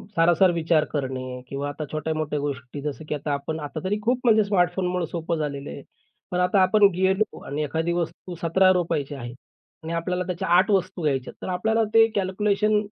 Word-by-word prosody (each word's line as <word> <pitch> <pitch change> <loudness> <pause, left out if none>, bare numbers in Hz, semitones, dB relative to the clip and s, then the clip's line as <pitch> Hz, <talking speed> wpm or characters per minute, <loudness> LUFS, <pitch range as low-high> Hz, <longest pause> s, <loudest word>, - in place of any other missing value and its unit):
सारासार 175 +2 +4
विचार 165 -2 +2
करणे, 130 -2 -3
किंवा 140 +1 -4
आता 150 +2 -5
छोट्या-मोठ्या 155 -1 -2
गोष्टी 140 -1 -5
जसं, 150 +1 -5
की - - 0
आता 145 0 -3
आपण 140 +3 -3
आता 150 +1 -5
तरी 205 +3 -1
खूप 245 +3 +1
म्हणजे 220 -2 +5
स्मार्टफोनमुळे 180 -2 +1
सोपं 165 0 -3
झालेलं 145 -2 -4
आहे. 140 - -8 0.5
पण 180 - 0
आता 180 +2 +3
आपण 205 +2 +5
गेलो 190 +3 +1
आणि 145 +2 -2
एखादी 160 +3 -1
वस्तू 175 +1 -4
₹17 180 -1 +3
ची 145 - -7
आहे 120 -3 -7 0.5
आणि 165 +1 -4
आपल्याला 180 +2 -1
त्याच्या 180 +1 -3
8 185 +3 +3
वस्तू 190 -2 0
घ्यायच्यात. 135 -4 -1
तर - - -5
आपल्याला 220 +5 +1
ते 225 0 +7
कॅल्क्युलेशन 210 +2 +1
170 Hz, 180 wpm, -24 LUFS, 150-190 Hz, 0.5 s, ते